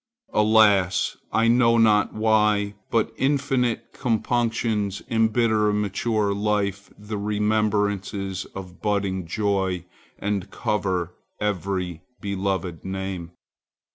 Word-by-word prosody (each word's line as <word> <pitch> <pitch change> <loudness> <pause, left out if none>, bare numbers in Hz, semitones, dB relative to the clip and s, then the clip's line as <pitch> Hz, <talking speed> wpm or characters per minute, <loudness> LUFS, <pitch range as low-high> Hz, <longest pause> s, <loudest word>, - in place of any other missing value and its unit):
Alas! 105 -4 +4 0.2
I 115 +1 +3
know 115 0 +4
not 105 -2 +4
why, 105 -2 +2 0.2
but 115 -2 +1
infinite 135 -3 0
compunctions 115 -4 0
embitter 110 -1 +3
in 105 0 +1
mature 105 +1 0
life 100 -1 -1
the 105 0 -5
remembrances 105 -2 0
of 90 -2 -9
budding 100 -4 -1
joy 95 -2 -1 0.3
and 100 -1 -2
cover 90 -5 -1 0.3
every 95 -4 -2 0.2
beloved 95 -4 -2
name. 95 -3 -5
105 Hz, 95 wpm, -24 LUFS, 95-110 Hz, 0.3 s, Alas